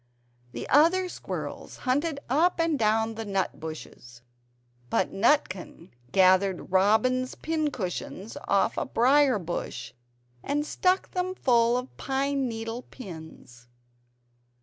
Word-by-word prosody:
The 120 Hz, -, -5 dB
other 340 Hz, +6 st, +4 dB
squirrels -, -, -6 dB
hunted 285 Hz, +4 st, 0 dB
up 330 Hz, +8 st, +2 dB
and 330 Hz, -4 st, +1 dB
down 220 Hz, +1 st, +2 dB
the 225 Hz, 0 st, -5 dB
nut 195 Hz, -3 st, -2 dB
bushes; 125 Hz, -6 st, -9 dB, 0.7 s
but 185 Hz, -, 0 dB
Nutkin 195 Hz, -, 0 dB, 0.2 s
gathered 185 Hz, +1 st, +3 dB
robin's 220 Hz, +7 st, +2 dB
pin 315 Hz, -2 st, -1 dB
cushions 195 Hz, -2 st, -5 dB
off 200 Hz, -1 st, +2 dB
a -, -, 0 dB
briar 265 Hz, +1 st, +4 dB
bush, 175 Hz, -2 st, -5 dB, 0.5 s
and 295 Hz, +1 st, -1 dB
stuck 365 Hz, +4 st, +1 dB
them 370 Hz, 0 st, -2 dB
full 240 Hz, -5 st, +3 dB
of 250 Hz, +1 st, -6 dB
pine 275 Hz, 0 st, -1 dB
needle 225 Hz, +1 st, -4 dB
pins. 160 Hz, -, -12 dB
235 Hz, 115 wpm, -27 LUFS, 190-285 Hz, 0.7 s, other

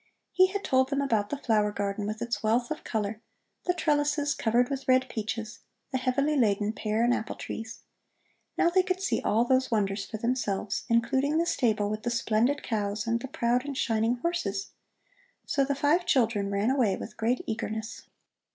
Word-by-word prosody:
He 370 Hz, 0 st, +5 dB
had 400 Hz, +1 st, -4 dB
told 260 Hz, 0 st, +2 dB
them 280 Hz, 0 st, 0 dB
about 225 Hz, -7 st, +1 dB
the 290 Hz, -, -2 dB
flower 215 Hz, -6 st, +1 dB
garden 200 Hz, 0 st, -2 dB
with 215 Hz, +2 st, -3 dB
its 235 Hz, 0 st, -3 dB
wealth 235 Hz, +4 st, +1 dB
of 310 Hz, -, -4 dB
color, 215 Hz, 0 st, -3 dB, 0.5 s
the 360 Hz, -, +3 dB
trellises, 295 Hz, -2 st, +1 dB
covered 240 Hz, +2 st, +2 dB
with 275 Hz, 0 st, -5 dB
red 260 Hz, 0 st, +4 dB
peaches, 220 Hz, +1 st, -4 dB, 0.3 s
the 260 Hz, -, 0 dB
heavily 275 Hz, +4 st, +1 dB
laden 210 Hz, -4 st, +2 dB
pear 220 Hz, +1 st, -1 dB
and 240 Hz, +1 st, +4 dB
apple 220 Hz, -, -3 dB
trees. 225 Hz, +1 st, -7 dB, 0.8 s
Now 345 Hz, -, +3 dB
they 370 Hz, +1 st, +5 dB
could 370 Hz, 0 st, -2 dB
see 390 Hz, -, 0 dB
all 225 Hz, +3 st, +2 dB
those 260 Hz, +1 st, +2 dB
wonders 200 Hz, -3 st, 0 dB
for 220 Hz, -, -5 dB
themselves, 220 Hz, -4 st, -1 dB
including 265 Hz, +6 st, +2 dB
the 335 Hz, -, +2 dB
stable 220 Hz, -10 st, +1 dB
with 215 Hz, +1 st, -3 dB
the 240 Hz, -, -2 dB
splendid 235 Hz, +4 st, +1 dB
cows 205 Hz, -2 st, -2 dB
and 230 Hz, 0 st, 0 dB
the 265 Hz, -, -6 dB
proud 245 Hz, -1 st, 0 dB
and 280 Hz, -2 st, -5 dB
shining 225 Hz, -1 st, +1 dB
horses. 240 Hz, -, -2 dB, 0.7 s
So 280 Hz, -, +1 dB
the 280 Hz, +1 st, 0 dB
five 310 Hz, +6 st, +2 dB
children 225 Hz, -, +2 dB
ran 200 Hz, +4 st, +1 dB
away 240 Hz, -8 st, +2 dB
with -, -, -8 dB
great 230 Hz, +3 st, 0 dB
eagerness. 220 Hz, 0 st, -4 dB
235 Hz, 185 wpm, -28 LUFS, 215-275 Hz, 0.8 s, He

